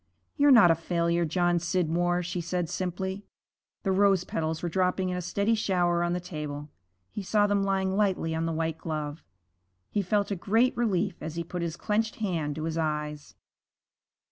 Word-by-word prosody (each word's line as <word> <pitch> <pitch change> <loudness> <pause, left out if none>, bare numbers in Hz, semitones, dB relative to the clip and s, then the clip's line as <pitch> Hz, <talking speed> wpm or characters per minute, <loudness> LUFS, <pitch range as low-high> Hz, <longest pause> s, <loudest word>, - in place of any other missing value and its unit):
'You're 290 -1 +4
not 230 -10 +8
a - - +6
failure, 170 +1 0
John 175 +1 +1
Scidmore,' 175 0 0
she 175 +1 -3
said 170 0 -2
simply. 190 +2 -3 0.6
The 195 - +1
rose 195 -1 +4
petals 160 -1 -3
were - - 0
dropping 185 +2 +1
in 180 - -2
a - - -2
steady 200 +5 0
shower 175 -5 +1
on 175 0 0
the 180 - -1
table. 150 -4 -6 0.4
He - - -4
saw 205 +2 +2
them 205 -1 +2
lying 190 -1 0
lightly 190 -5 +1
on 165 +1 -1
the - - -1
white 160 0 -2
glove. 155 -1 -4 0.7
He 205 - +1
felt 200 +2 0
a - - +1
great 225 +7 +2
relief 200 -5 0
as 160 +1 -5
he 170 - -2
put 175 +1 -5
his 170 -1 -3
clenched 220 +1 0
hand 165 -9 -2
to 155 - -4
his 165 0 -2
eyes. 150 -1 -3
175 Hz, 185 wpm, -28 LUFS, 165-195 Hz, 0.7 s, not